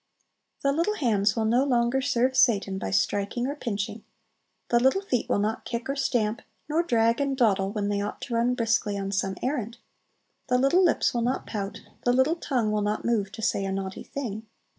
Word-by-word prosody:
The 275 - +3
little 340 +8 0
hands 210 - +2
will 225 -1 0
no 240 +4 +3
longer 245 -1 +2
serve 255 0 +1
Satan 200 -6 +3
by - - -3
striking 200 +4 0
or 280 - -1
pinching; 210 -4 -4 0.7
the 235 - +4
little 265 +11 +2
feet 250 - -1
will - - +2
not 210 +2 -1
kick 235 0 -4
or 275 - -1
stamp, 235 -5 0 0.3
nor 310 +3 +2
drag 230 -5 +2
and 275 -1 -1
dawdle, 200 -5 +2
when 205 -1 -2
they 205 0 0
ought 205 - -4
to 245 - -5
run 235 +2 +2
briskly 225 -3 0
on 195 0 -3
some 195 -1 -1
errand; 245 -4 -2 0.7
the 250 -1 +3
little 275 +9 +4
lips 340 - +2
will 240 - 0
not 250 +3 -1
pout; 200 -2 -5 0.2
the 245 - +3
little 260 +6 +3
tongue 245 -9 0
will 210 0 0
not 210 +1 -1
move 215 -5 0
to 220 - -7
say 200 - +1
a 195 - -2
naughty 190 0 -4
thing. 220 -5 -6
235 Hz, 205 wpm, -26 LUFS, 205-260 Hz, 0.7 s, the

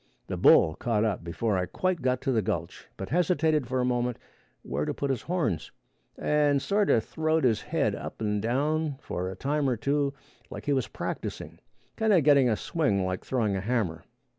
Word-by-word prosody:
The - - -4
bull 80 - +6
caught 110 +3 0
up 100 -6 -1
before 95 +4 -1
I 90 - -1
quite 185 - -1
got 130 -1 0
to 135 - 0
the 115 -3 +2
gulch, 85 -3 -4
but 95 - -6
hesitated 160 -5 +2
for 130 +1 -1
a 125 - +1
moment 125 -1 0 0.5
where 70 +3 -2
to - - -2
put 140 -1 -1
his 130 - -2
horns, 160 - -1 0.5
and 145 -2 +2
sort 200 +7 +1
a - - +5
throwed 160 +7 0
his 115 -5 +2
head - - 0
up - - -7
and 105 -2 -1
down 145 +5 0
for 90 -9 -4
a 95 - -6
time 140 +5 0
or 125 - 0
two, 140 +3 0 0.4
like - - -8
he 145 - +2
was 130 -3 0
practicing - - -5 0.4
kind 220 -1 +3
a 185 - +6
getting 140 -4 +5
a 110 - +2
swing 105 - 0
like 95 0 -3
throwing 110 -6 0
a 95 - -2
hammer. 100 -7 -1
125 Hz, 200 wpm, -28 LUFS, 105-150 Hz, 0.5 s, bull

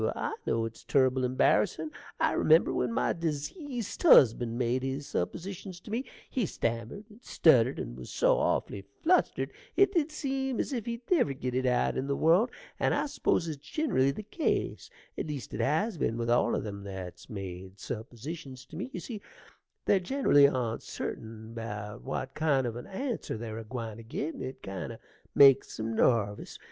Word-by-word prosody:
I - - -2
know 115 0 +1
it's 115 0 -8
turrible 130 -1 +3
embarrassin'. 130 +4 +2 0.3
I - - +3
remember 160 +1 +4
when 125 -2 0
my - - +1
dezeased 185 - -4
husband 120 - +6
made 125 +1 +1
his 135 +2 -3
suppositions 180 - -4
to 210 - -10
me 245 +5 -1 0.2
he 240 -8 -1
stammered 115 - -3
and 215 +3 -16
stuttered, 130 - +4
and - - -5
was 65 -1 -9
so - - +3
awfully 100 - 0 0.2
flustered 360 +3 +2 0.2
it 395 0 +5
did 320 -4 +1
seem 270 -4 -2
as - - -1
if 235 -4 -3
he'd 235 +1 -4
never 300 - +3
git 130 -1 -4
it 130 +1 +1
out 125 -1 +2
in 135 - -2
the 140 - 0
world; 175 - +4 0.3
and - - +2
I - - +1
suppose 185 - 0
it's 150 -3 -6
ginerally 145 - +1
the 210 - -7
case, 225 - -1 0.3
at - - -2
least 140 -7 -5
it - - -2
has 170 +6 +1
been 115 - 0
with 120 0 0
all 120 0 +3
them 100 -2 -6
that's 95 0 -8
made 95 -2 -7
suppositions 130 +5 -7
to - - -9
me: 190 +10 -4
you - - -5
see 220 -5 -7 0.6
they're 200 - +4
generally 185 - +4
oncerting 115 -3 -4
about 105 -1 -6
what 135 0 -4
kind 145 -4 +2
of 115 -2 -3
an 120 - -7
answer 235 - -3
they're 110 0 -5
a - - -6
gwine 115 -1 -5
to 115 - -10
git, 140 +7 -3
and - - -7
it 130 0 -7
kind 95 -2 -5
o' - - -10 0.4
makes 135 -4 +6
'em 110 +1 -2
narvous. 105 -5 +1
130 Hz, 180 wpm, -30 LUFS, 115-190 Hz, 0.6 s, husband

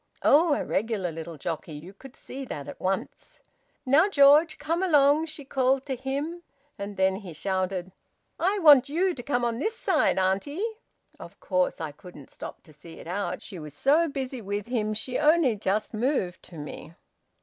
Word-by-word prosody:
Oh! 310 0 +5
A - - -3
regular 205 -4 -1
little 165 0 -7
jockey! 160 +2 -5
You 160 +6 -10
could 260 +6 -14
see 270 +1 -8
that 145 - -6
at - - -9
once. 190 +1 -4 0.5
`Now, 310 +9 +5
George, 300 0 +5
come 330 +3 -1
along,' 300 -3 +4
she 310 -3 -9
called 265 0 +1
to 270 - -2
him. 280 +7 -4 0.3
And 200 0 -7
then 190 0 +2
he 190 -5 -9
shouted, 185 +1 -2 0.5
`I 385 +2 +1
want 285 -3 +8
you 360 +5 +1
to 255 - -7
come 245 -1 0
on 235 0 -1
this 440 +9 -1
side, 350 - +2
auntie.' 200 - 0 0.5
Of - - -12
course 185 -2 0
I 160 -2 -4
couldn't 145 -2 -13
stop - - -9
to 155 - -17
see 165 +3 -13
it - - -11
out. 180 +1 -3
She 185 - -8
was 150 -2 -9
so 305 - +3
busy 265 -3 -4
with 205 0 -3
him 215 -3 -1
she 245 +4 -2
only 305 -5 +4
just 210 +2 -1
moved 215 -6 -1
to 170 - -12
me." 150 +2 -9
240 Hz, 180 wpm, -26 LUFS, 185-290 Hz, 0.5 s, want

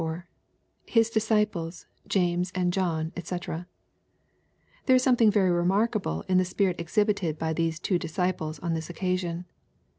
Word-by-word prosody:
— - - -45
[His 230 -1 +3
discipleSj 210 -6 0 0.2
James 180 -1 +1
and 180 -1 +1
John^ 165 -4 -1
djc] 175 0 -5 1.2
There 260 - +6
is 255 - +4
something 245 -4 +5
very 200 -3 +3
remarkable 190 - +1
in 185 -1 +4
the - - +3
spirit 185 0 0
exhibited 175 -1 0
by 160 +1 -1
these 165 0 -1
two 180 0 0
disciples 165 -2 -2
on 170 +2 -2
this 160 0 -4
occasion. 180 -1 -2
180 Hz, 140 wpm, -27 LUFS, 165-205 Hz, 1.2 s, There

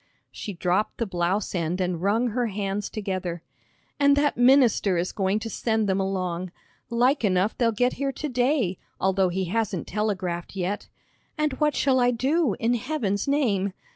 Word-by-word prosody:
She 205 - -6
dropped 180 +4 0
the 230 - -1
blouse 185 +1 -1
end 175 0 -1
and 180 -2 -1
wrung 220 +6 +2
her 240 +2 0
hands 200 -1 -3
together. 185 -5 -4 0.6
"And 280 0 +5
that 290 0 +2
minister 245 -7 +4
is 175 +2 -1
going 195 0 0
to 220 - -4
send 220 -1 0
them 190 0 +1
along. 185 -2 -2 0.4
Like 245 +3 +2
enough 190 +1 +2
they'll 235 -2 +2
get 245 +3 +1
here 275 -1 +1
to 300 - -4
day, 245 - +1 0.2
although 190 -1 +2
he 190 +1 -1
hasn't 195 -2 -1
telegraphed 190 -4 -2
yet. 190 +2 -3 0.5
And 305 -2 0
what 300 -1 +2
shall 265 -2 +3
I 245 0 +4
do, 260 - +1
in 230 +2 +2
Heaven's 240 -5 -1
name!" 210 -10 +1
210 Hz, 170 wpm, -25 LUFS, 185-245 Hz, 0.6 s, And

